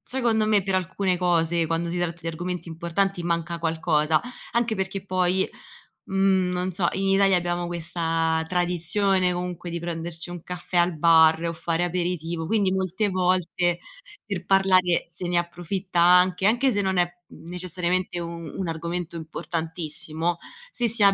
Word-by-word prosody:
secondo 235 -4 0
me 210 -2 +3
per 190 0 0
alcune 185 +1 0
cose, 170 -2 +1
quando 165 +1 -1
si 175 - -2
tratta 170 -1 -1
di 165 - -4
argomenti 175 +2 -4
importanti, 170 +4 0
manca 170 0 -1
qualcosa, 160 -1 +1 0.3
anche 235 -2 +1
perché 190 0 -3
poi, 185 0 +1 0.6
mhmm, 190 -1 +2
non 180 +1 -1
so, 175 0 0
in 195 0 -1
Italia 195 -1 +5
abbiamo 175 0 -1
questa 165 -1 -1
tradizione 180 +2 +1
comunque 180 -1 -5
di 170 0 -4
prenderci 170 0 -5
un 175 -2 -7
caffè 180 0 -5
al 175 -1 +3
bar 160 0 +5
o 170 - 0
fare 165 +1 -1
aperitivo, 170 -2 -2
quindi 200 -1 +1
molte 190 +2 0
volte 180 -2 +1 0.5
per 195 -4 -4
parlare 185 -2 +3
se 175 +2 -5
ne 175 0 +2
approfitta 175 +2 -3
anche 180 +2 +5
anche 245 +5 +3
se 205 -1 +1
non 190 -1 0
è, 175 0 +2 0.2
uhm, 165 - -14
necessariamente 180 0 -1
u 170 - -4
un 170 +2 -6
argomento 170 +1 -4
importantissimo, 160 0 -3 0.3
se 240 - 0
si 225 0 +2
ha 200 - +7
175 Hz, 160 wpm, -24 LUFS, 170-190 Hz, 0.6 s, ha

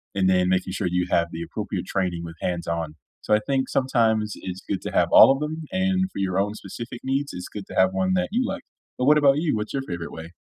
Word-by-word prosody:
and 95 -1 +2
then 90 -1 +3
making 95 0 0
sure 95 -1 -1
you 90 0 0
have 85 0 +3
the 80 +1 -6
appropriate - - -4
training 90 -3 -1
with 85 -1 -8
hands-on. 85 -3 -2 0.3
So, 105 - +3
I - - +3
think 135 -1 0
sometimes 110 -5 +1
it's 95 0 -7
good 100 - -2
to - - -4
have - - +2
all - - +9
of 135 - +1
them, 155 +2 -3
and 190 0 +1
for - - -10
your 95 -1 0
own 105 +2 -1
specific 120 +2 -8
needs, 135 +2 -1
it's 90 0 -6
good 100 -2 -6
to - - -9
have 95 0 +5
one 95 -1 0
that 90 0 0
you - - +1
like. - - -4 0.3
But 125 - 0
what 150 +1 +6
about 140 -1 +5
you? 155 -6 +1
What's 105 0 -4
your 135 -1 -1
favorite 85 -1 -5
way? 80 +1 -9
95 Hz, 255 wpm, -24 LUFS, 90-135 Hz, 0.3 s, all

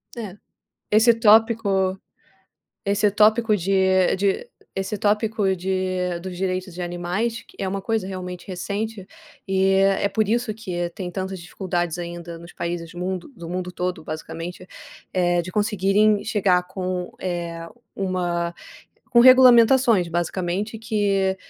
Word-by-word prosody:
É, 210 -5 -7 0.5
esse 220 +3 +6
tópico 215 -4 +3 0.9
esse 205 +1 +2
tópico 215 +2 +4
de 190 0 +2
de 200 - 0 0.3
esse 195 +2 -3
tópico 210 -1 +1
de 185 -1 -2
dos 185 +1 -7
direitos 185 0 -2
de 175 - -8
animais 180 +6 -2
que - - -20
é 190 - -1
uma 195 +1 -3
coisa 220 -1 -1
realmente 180 -2 -7
recente, 200 +2 -4 0.4
e 190 -1 +2
é 195 0 +3
é - - +3
por 215 +1 0
isso 235 0 0
que 180 -5 -4
tem 180 -2 -5
tantas 190 +1 -4
dificuldades 175 -1 -3
ainda 170 -1 -7
nos 170 +1 -12
países 170 0 -4
mundo 180 0 -4
do 170 -4 -8
mundo 180 0 -3
todo, 180 -1 -3
basicamente, 165 +3 -7 0.5
eh, 175 -1 +2
de 185 +2 -8
conseguirem 205 +1 +2
chegar 195 -5 +2
com, 185 -1 -4
eh, 170 -2 -4 0.3
uma 175 -3 -2 0.6
com 240 -2 +6
regulamentações, 245 -5 +6
basicamente, 180 +5 -2
que 200 -4 0
190 Hz, 135 wpm, -23 LUFS, 180-210 Hz, 0.9 s, esse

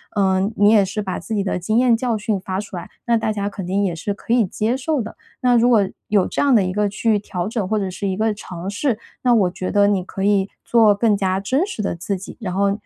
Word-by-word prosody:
呃， 190 -2 +2 0.2
你 205 +1 +5
也 210 -3 +6
是 205 +3 -4
把 185 -2 -3
自 220 - -5
己 200 - 0
的 190 - -2
经 215 +6 0
验 245 -1 +4
教 230 -2 -1
训 210 -1 -1
发 185 +1 -3
出 205 -2 -7
来， 175 - -7 0.2
那 235 - +2
大 220 -1 -1
家 200 -1 -2
肯 190 -3 -7
定 200 +2 0
也 180 -3 0
是 200 +5 -3
可 230 - -3
以 235 -4 +4
接 220 +6 -1
受 280 +2 -1
的。 220 -1 -5 0.3
那 250 -1 +4
如 240 +1 +4
果 210 -5 +4 0.2
有 205 -3 +2
这 - - -2
样 280 -3 +4
的 205 - +4
一 185 0 -2
个 210 0 +1
去 210 +1 +1
调 180 -2 -4
整， 220 -3 -2
或 220 - +1
者 195 -2 -1
是 200 +2 -4
一 190 0 -2
个 220 0 +1
尝 180 -3 -8
试， 230 +2 -1 0.2
那 245 -1 +3
我 195 -6 +3
觉 185 0 -4
得 205 -1 +4
你 195 -3 +1
可 190 +1 -6
以 200 -1 +2 0.2
做 225 -3 +5
更 215 0 +2
加 190 -1 0
真 260 - 0
实 395 - -5
的 195 - -2
自 190 +3 -3
己， 190 - -10
然 185 -5 -3
后， 200 +1 +2
205 Hz, 295 characters per minute, -20 LUFS, 190-225 Hz, 0.3 s, 也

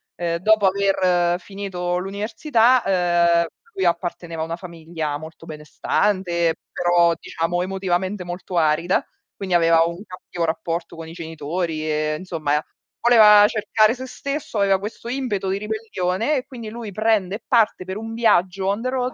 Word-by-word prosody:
ehm, 170 -1 -2
dopo 210 +2 +3
aver 185 -3 +2
finito 185 -3 -4
l'università, 225 +5 +1 0.6
ehm, 170 - 0 0.3
lui 190 - -1
apparteneva 170 -1 -2
a - - -2
una 165 - -4
famiglia 165 -4 -5
molto 160 +1 -11
benestante, 170 +2 0 0.2
però 175 -1 +3
diciamo 170 +2 -2
emotivamente 190 +1 -2
molto 175 +1 -5
arida, 165 +3 +2 0.3
quindi 185 -3 -2
aveva 165 -1 +5
un 170 +4 -5
cattivo 180 -2 -6
rapporto 165 +1 -3
con 165 0 -8
i 165 - -10
genitori 160 0 -4
e, 155 0 0
insomma, 155 -5 -1 0.4
voleva 210 -3 +7
cercare 215 0 +2
se 260 - -7
stesso, 280 -2 -5
aveva 195 -1 +3
questo 210 +3 -7
impeto 240 -7 -2
di 195 - 0
ribellione, 215 +2 -2
e 255 - -4
quindi 240 -5 -9
lui 225 -1 -7
prende 215 -2 +1
e 220 - -9
parte 225 -6 +2
per 190 +1 -5
un 225 +1 -6
viaggio 195 -4 +2
on 200 +3 0
the 255 - -1
road, 255 -1 -2
185 Hz, 155 wpm, -22 LUFS, 170-215 Hz, 0.6 s, voleva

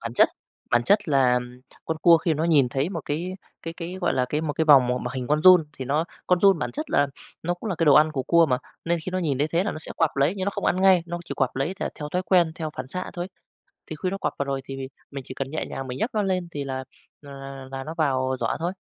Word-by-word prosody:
Bản 115 +1 -6
chất - - +5 0.4
bản 120 0 +3
chất 205 -3 +3
là 130 -3 +4 0.5
con 160 - -2
cua 170 -2 +8
khi 160 -1 0
nó 155 +3 -1
nhìn 145 -6 +4
thấy 135 +6 -1
một 170 - -4
cái 170 +5 -3 0.3
cái 165 0 -6
cái, 175 +2 -6
gọi 175 - +1
là, 125 - +2
cái 150 +3 -1
một 155 -2 -2
cái 160 - 0
vòng 140 -5 +7
m 125 0 -1
mà 125 - -3
hình 125 -1 -3
con 150 +1 +2
giun 180 -3 +8
thì 130 - -4
nó 150 +5 +1 0.2
con 180 -1 +3
giun 195 -4 +5
bản - - -3
chất 305 +2 -5
là 145 - +3 0.4
nó 175 +2 -1
cũng 180 +5 -7
là 175 - -2
cái 165 - +1
đồ 145 - +7
ăn 155 +1 +5
của 135 - -2
cua 170 +4 +4
mà, 125 -3 +1 0.3
nên 170 0 +1
khi 185 - -5
nó 185 - 0
nhìn 150 -7 -1
thấy 150 +2 +1
thế 170 +4 +1
là 205 - -1
nó - - -6
sẽ - - -8
quặp 165 -2 +2
lấy 140 +7 +2
nhưng 190 - -2
nó 200 - 0
không - - -5
ăn 185 - +1
ngay, 190 -2 +5
nó 175 0 -4
chỉ - - -6
quặp 135 -1 0
lấy 155 +8 -1
th - - -7
theo 150 -2 -6
thói 180 - 0
quen, 175 -2 +3
theo 160 -3 -4
phản 130 0 -5
xạ 180 +6 -5
thôi. 175 +1 -5 0.6
Thì 155 - -7
khi 185 - 0
nó 195 - -4
quặp - - -1
vào 140 - -1
rồi 135 -1 -2
thì 135 0 -7 0.3
mình 140 -2 -7
chỉ 130 - -8
cần 135 -1 -4
nhẹ 155 - -3
nhàng 135 - -5
mình 125 +1 -5
nhấc 235 - -1
nó 210 - +2
lên 185 -3 -1
thì 145 -1 -4
là 130 -1 -4 0.4
là 140 -1 -11
là 135 -1 -9
là 135 0 -5
nó 160 - -6
vào 130 -3 +1
giỏ - - 0
thôi. 170 +3 -2
155 Hz, 300 wpm, -25 LUFS, 135-175 Hz, 0.6 s, cua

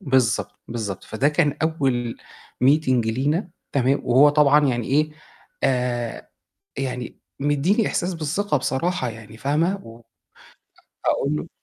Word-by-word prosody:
بالضبط، 120 - +1
بالضبط، 105 -5 -4
فده 130 +6 +1
كان 150 -1 +1
أول 135 -7 0 0.5
meeting 150 +2 +4 0.2
لينا 145 - 0 0.2
تمام، 135 0 +2
وهو 130 +4 +6
طبعًا 145 0 +5
يعني 120 -3 -1
إيه، 150 +3 +2 0.5
آآ، 125 -3 -1 0.5
يعني 125 -3 -4 0.2
مدّي 145 +6 +2
لي 215 -1 +2
إحساس 180 +1 -1
بالثقة 160 +2 -1
بصراحة 135 +1 -1
يعني 110 -1 -11
فاهمة، 150 - +1
و 115 0 -11 1.1
أ - - +5
أقول 145 +2 0
له 155 - -5
135 Hz, 130 wpm, -23 LUFS, 120-150 Hz, 1.1 s, وهو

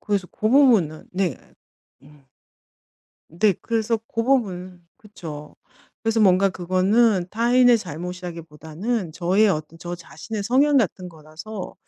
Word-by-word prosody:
그래서 200 -4 -1
고 215 - -2
부분은 225 - +3
네. 180 -6 -1 0.7
음. 145 -1 -20 1.0
네 195 +5 +2
그래서 230 0 0
고 230 -1 -3
부분은 185 -9 -1
그쵸. 160 -8 -10 0.5
그래서 225 0 +1
뭔가 195 -1 +4
그거는 185 +2 +2
타인의 240 +1 +4
잘못이라기보다는 175 +2 -5
저의 190 +6 +2
어떤 155 -2 -3
저 175 +1 -6
자신의 200 +5 -7
성향 275 +7 +3
같은 185 -6 0
거라서 165 +5 -9
185 Hz, 270 characters per minute, -22 LUFS, 170-225 Hz, 1.0 s, 뭔가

